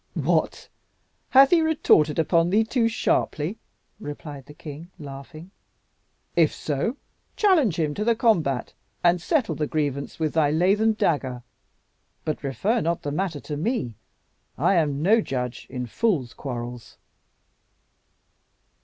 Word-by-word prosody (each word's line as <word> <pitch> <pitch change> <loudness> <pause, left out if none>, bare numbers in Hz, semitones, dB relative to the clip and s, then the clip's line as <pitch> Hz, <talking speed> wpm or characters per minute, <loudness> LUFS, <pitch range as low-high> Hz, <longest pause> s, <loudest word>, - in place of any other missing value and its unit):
"What! - - 0 0.6
hath 270 +1 +7
he 345 -2 +5
retorted 285 - +3
upon 165 +1 +2
thee 210 +4 +3
too 230 +1 +1
sharply?" 195 -4 -1 0.4
replied 145 -5 -8
the 150 - -11
king, 155 +3 -9
laughing. 155 +4 -10 0.8
"If 165 -3 +4
so, 155 - -2 0.4
challenge 320 - +3
him 150 -2 0
to 205 - -2
the 230 +1 +3
combat, 170 - +1 0.3
and 175 0 +4
settle 270 - +1
the 150 - -2
grievance 145 -3 -2
with 155 -2 -1
thy 155 -3 +3
lathen 195 +8 +3
dagger. 130 - -1 0.8
But 155 - -3
refer 200 - 0
not 170 +1 -1
the 145 - -3
matter 165 -1 -2
to 150 - -5
me. 160 - -2 0.6
I 170 +8 +3
am 150 -5 +1
no 220 +5 +5
judge 125 - -4
in 125 -1 -4
fools' 140 - 0
quarrels." 120 -2 -7
160 Hz, 130 wpm, -24 LUFS, 145-215 Hz, 0.8 s, hath